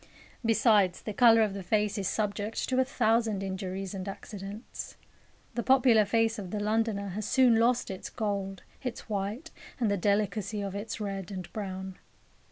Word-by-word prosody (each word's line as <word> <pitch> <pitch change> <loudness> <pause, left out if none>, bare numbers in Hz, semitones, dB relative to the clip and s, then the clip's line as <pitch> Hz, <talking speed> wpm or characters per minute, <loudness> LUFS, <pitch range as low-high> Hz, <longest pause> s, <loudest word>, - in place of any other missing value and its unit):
Besides, 215 -5 +3
the 215 - -4
colour 230 0 +6
of 210 -2 0
the 200 - -5
face 210 +2 +1
is 195 -3 -1
subject 210 0 -2
to 260 0 +2
a - - +6
thousand 225 -5 +1
injuries 190 0 -4
and 190 0 -5
accidents. 200 +3 -8 0.6
The 240 - -1
popular 245 -4 +5
face 225 +1 +1
of 190 -3 -6
the 210 - -3
Londoner 210 -1 0
has 210 +3 -4
soon 250 -4 +5
lost 235 -1 +2
its 190 - -6
gold, 200 -4 -3 0.2
its 250 -3 -5
white, 215 +9 -3 0.3
and 225 -4 +2
the 200 - +1
delicacy 205 +2 0
of 195 -1 -4
its 205 +3 -5
red 195 -3 -4
and 185 -3 -7
brown. 190 -2 -5
210 Hz, 170 wpm, -29 LUFS, 195-225 Hz, 0.6 s, colour